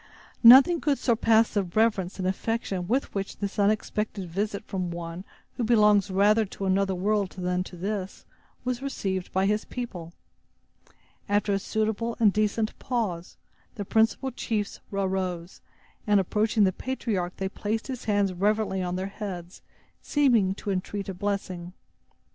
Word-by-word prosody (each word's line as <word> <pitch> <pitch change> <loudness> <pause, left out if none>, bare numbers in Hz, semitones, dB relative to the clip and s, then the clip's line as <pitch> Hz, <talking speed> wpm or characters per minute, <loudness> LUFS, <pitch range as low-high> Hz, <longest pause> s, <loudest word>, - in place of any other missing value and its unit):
Nothing 270 +8 +8
could 285 -3 +1
surpass 225 -2 +3
the 205 - +2
reverence 195 0 0
and 185 -1 -2
affection 190 -2 -2
with 255 +6 0
which 195 -1 -4
this 200 0 -4
unexpected 210 -1 0
visit 200 +4 -3
from 185 -3 -3
one 170 +1 -6 0.3
who 245 - -1
belongs 210 -3 +4
rather 205 +3 +4
to 195 -1 -6
another 190 0 +1
world 200 +1 0
than 180 0 -1
to 180 - -10
this, 195 +1 -4 0.4
was 250 0 -2
received 190 -9 -3
by 190 +1 +1
his 210 +1 +1
people. 180 -10 -6 1.2
After 205 0 +2
a 195 - +1
suitable 220 +3 -2
and 210 -4 +5
decent 215 +1 0
pause, 205 -9 -3 0.4
the 205 - -5
principal 225 +6 +1
chiefs 215 -4 -3
arose, 185 -3 -2 0.5
and, 205 -1 +5
approaching 210 +3 +1
the 190 -1 +3
patriarch, 205 -9 -3
they 190 - -2
placed 215 +3 -3
his 255 -3 -6
hands 205 -3 +1
reverently 205 +1 0
on 180 0 -2
their 185 +1 -2
heads, 195 -3 -7 0.4
seeming 235 -10 +2
to 200 - -4
entreat 195 +1 -3
a - - -3
blessing. 185 -2 -3
200 Hz, 150 wpm, -26 LUFS, 185-220 Hz, 1.2 s, Nothing